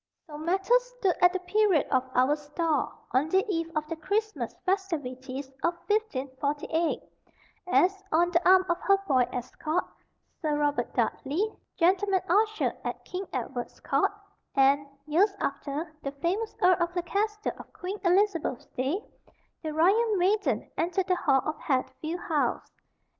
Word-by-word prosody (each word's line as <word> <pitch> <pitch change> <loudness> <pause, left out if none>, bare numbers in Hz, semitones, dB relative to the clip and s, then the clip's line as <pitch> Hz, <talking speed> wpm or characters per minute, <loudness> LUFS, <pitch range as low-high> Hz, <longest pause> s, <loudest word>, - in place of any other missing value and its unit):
So 300 - -10
matters 385 +10 +2
stood 390 -7 +2
at 355 0 +7
the 375 - -1
period 380 -3 +3
of 260 -1 +3
our 255 +4 +4
store, 300 0 -1 0.2
on 270 +5 +2
the 380 +4 +3
eve 330 -4 -1
of 305 0 -1
the 330 - -3
Christmas 430 +7 -2
festivities 285 -9 -2 0.2
of 340 +1 +2
1548, 295 -5 -1 0.6
as, 380 +2 +3
on, 345 +2 +3
the 345 0 +2
arm 375 0 +7
of 345 -1 0
her 395 0 +4
boy 255 -5 +3
escort, 305 +7 -2 0.6
Sir 305 -3 0
Robert 290 0 0
Dudley, 350 +11 0 0.2
gentleman 380 +2 +3
usher 430 +4 +2
at - - -5
King 370 +1 -5
Edward's 245 -1 -4
court, - - +1 0.4
and, 280 +1 +4 0.2
years 380 +7 +3
after, 285 +3 -3
the 275 - -4
famous 360 +10 -2
Earl 365 0 +5
of 345 +1 -1
Leicester 420 +5 -1
of - - -11
Queen 380 +3 -5
Elizabeth's 360 - +2
day, 275 - -1 0.6
the 315 -2 -3
royal 405 +8 +3
maiden 400 +3 +1
entered 360 +3 +1
the 370 - +2
hall 270 -6 +2
of 310 0 -3
Hatfield 310 +5 -2
House. 305 -4 -1
340 Hz, 145 wpm, -28 LUFS, 290-385 Hz, 0.6 s, at